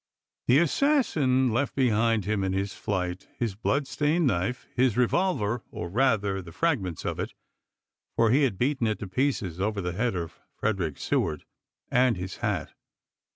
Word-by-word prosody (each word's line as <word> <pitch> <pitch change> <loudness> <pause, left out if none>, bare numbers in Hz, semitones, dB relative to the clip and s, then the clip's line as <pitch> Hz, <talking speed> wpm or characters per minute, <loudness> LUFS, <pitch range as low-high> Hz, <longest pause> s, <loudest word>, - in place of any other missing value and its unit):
The 125 - +6
assassin 155 - +2
left 135 +4 0
behind 115 -5 +2
him 105 -1 0
in 95 -1 0
his 95 0 -1
flight 90 -2 -3
his 115 -4 -1
bloodstained 150 - 0
knife, 125 +2 0
his 125 -3 +2
revolver, 125 - +1
— - - -39
or 85 - -5
rather 105 -3 +1
the 85 -2 -11
fragments 100 - -1
of - - -2
it, - - -4 0.8
for 115 -1 +3
he 135 +4 +4
had 125 -9 +1
beaten 130 0 +1
it 110 - 0
to 100 - -6
pieces 95 - -1
over 105 +1 0
the 90 -2 -2
head 115 +2 0
of 85 -2 -5 0.2
Frederick 95 -9 -1
Seward, 75 - -1 0.3
— - - -50
and 125 -4 +3
his 90 +1 -5
hat. - - -2
115 Hz, 165 wpm, -27 LUFS, 95-130 Hz, 0.8 s, The